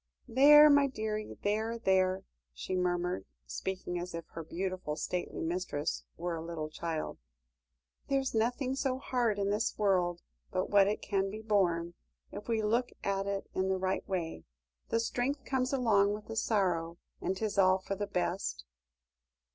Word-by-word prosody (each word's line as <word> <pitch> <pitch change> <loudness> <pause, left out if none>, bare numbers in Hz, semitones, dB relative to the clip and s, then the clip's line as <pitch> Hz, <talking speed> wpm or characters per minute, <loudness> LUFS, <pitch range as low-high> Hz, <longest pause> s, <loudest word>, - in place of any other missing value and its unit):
"There, 290 +5 +8
my 285 -1 +6
dearie, 215 -4 -4
there 220 +3 0
there," 190 -3 +2 0.3
she 185 - -3
murmured, 180 - 0 0.2
speaking 180 - -4
as 175 0 -5
if 165 - -5
her 165 - -7
beautiful, 185 -1 -3
stately 175 +3 -3
mistress 165 -3 -2
were 175 +1 -2
a 160 - -5
little 165 -2 -4
child; 160 -1 -4 0.9
"there's 270 -1 +1
nothing 250 +4 0
so 265 -1 0
hard 245 -5 0
in 200 0 0
this 210 +2 0
world 180 -4 +2 0.3
but 185 0 -2
what 200 -1 +6
it 210 - -1
can 195 -1 0
be 215 +2 -7
borne, 175 -5 +1 0.4
if 205 - -8
we 225 -2 +1
look 235 +4 +1
at 195 0 0
it 200 0 -2
in 190 0 0
the 190 - +2
right 190 +2 -2
way. 165 - -3 0.5
The 230 - +2
strength 250 +4 -1
comes 260 -1 0
along 210 -6 +3
with 210 - -9
the 225 - -6
sorrow, 175 -7 +1 0.2
and 190 - -1
'tis 210 -1 -1
all 185 0 +6
for 190 +1 -5
the 205 +1 -3
best." 60 - -2
195 Hz, 165 wpm, -32 LUFS, 175-225 Hz, 0.9 s, There